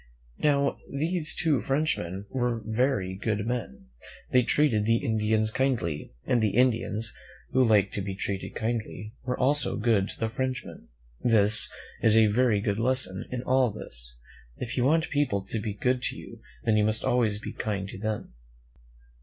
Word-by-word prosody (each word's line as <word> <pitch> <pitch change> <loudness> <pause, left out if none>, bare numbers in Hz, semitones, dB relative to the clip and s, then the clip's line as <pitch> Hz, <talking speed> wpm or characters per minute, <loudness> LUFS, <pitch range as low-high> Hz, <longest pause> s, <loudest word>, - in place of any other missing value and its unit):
Now, 140 -2 +2
these 160 +3 0
two 155 -5 +2
Frenchmen 105 - -1
were 120 -3 -1
very 110 -4 0
good 105 +2 -2
men. 115 - -4 0.4
They 125 - +5
treated 125 -4 +2
the 115 +1 +4
Indians 110 -1 +1
kindly, 115 - -1
and 120 -2 +2
the 105 -3 +1
Indians, 115 -3 +2 0.4
who 130 +1 +4
liked 105 -4 +3
to 100 - -2
be 95 0 -4
treated 100 0 -4
kindly, 110 -1 -3
were 125 0 -1
also 145 +3 +1
good 105 -3 +2
to - - -10
the 115 - 0
Frenchmen. 130 +2 -4 0.4
There 115 -4 +5
is 105 +2 +2 0.3
a 110 0 +6
very 105 0 +3
good 100 0 -1
lesson 125 -6 +1
in 125 -1 -3
all 130 -1 +3
this. - - -6 0.4
If 120 - -4
you 125 - +2
want 160 +3 +2
people 140 -10 +1
to 110 - -3
be 105 -1 -4
good 125 +4 +1
to - - -1
you, - - -11 0.2
then 110 - +3
you 105 - +4
must 110 +1 0
always 120 -5 +2
be 105 - -7
kind 100 -4 -3
to - - -8
them. 105 - -3
115 Hz, 170 wpm, -27 LUFS, 105-130 Hz, 0.4 s, a